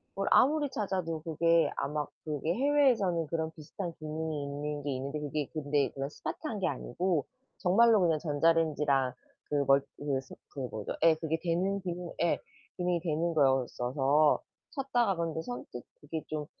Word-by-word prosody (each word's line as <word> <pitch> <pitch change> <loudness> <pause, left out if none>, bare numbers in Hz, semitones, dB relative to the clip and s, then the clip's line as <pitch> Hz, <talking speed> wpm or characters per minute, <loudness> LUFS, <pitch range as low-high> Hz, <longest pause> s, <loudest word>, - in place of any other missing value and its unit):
뭘 195 - -1
아무리 295 +2 +5
찾아도 185 -9 -2
그게 165 +1 +2
아마 150 0 -1 0.2
그게 155 +2 -1
해외에서는 245 - +3
그런 160 0 -2
비슷한 170 +3 -6
기능이 155 -1 -3
있는 145 0 -4
게 145 - -2
있는데 140 +3 -3
그게 150 -1 -2
근데 145 -2 +1
그런 135 0 -4
스마트한 220 - -5
게 185 - +1
아니고 165 +4 -1 0.3
정말로 215 +3 +5
그냥 165 -3 +3
전자레인지랑 150 -4 +2 0.4
그 145 -1 +2
멀 135 +1 +5 0.2
그 140 -2 -1
스 130 - -13
그거 130 -3 -5
뭐죠? 105 -2 -4
예. 165 -1 +7
그게 160 0 -1
되는 185 +3 +1
기능 175 -1 -5
예 170 - +2 0.4
기능이 180 -1 +1
되는 165 0 0
거였어서 135 +1 +3 0.3
샀다가 245 - +1
그런데 165 -1 -2
선뜻 125 -3 -7 0.2
그게 155 +2 -5
좀 155 -1 -3
160 Hz, 335 characters per minute, -31 LUFS, 145-180 Hz, 0.4 s, 예